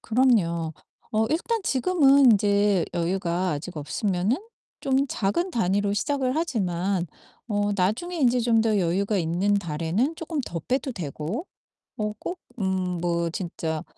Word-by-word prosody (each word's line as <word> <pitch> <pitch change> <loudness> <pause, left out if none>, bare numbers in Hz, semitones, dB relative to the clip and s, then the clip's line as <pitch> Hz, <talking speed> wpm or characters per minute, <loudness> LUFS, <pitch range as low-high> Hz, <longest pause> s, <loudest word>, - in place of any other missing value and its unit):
그럼요. 200 -10 +2 0.4
어 220 0 +2
일단 450 +8 0
지금은 275 -4 +5
인제 205 -2 +3
여유가 175 +1 0
아직 160 +3 -5
없으면은 180 - 0 0.4
좀 270 +1 +2
작은 245 - 0
단위로 205 - +1
시작을 260 +4 0
하지만 190 - 0 0.4
어 205 -1 +1
나중에 215 - 0
인제 250 -5 +3
좀 230 -1 +3
더 220 -2 +2
여유가 195 +4 +1
있는 175 +4 +1
달에는 175 - 0
조끔 320 -2 -3
더 170 -7 -5
빼도 260 - -1
되고 175 - -4 0.5
어 210 -1 -1
꼭 360 - -5 0.2
음 185 -2 -1
뭐 170 -1 0
진짜 165 -2 -4
205 Hz, 260 characters per minute, -25 LUFS, 175-255 Hz, 0.5 s, 지금은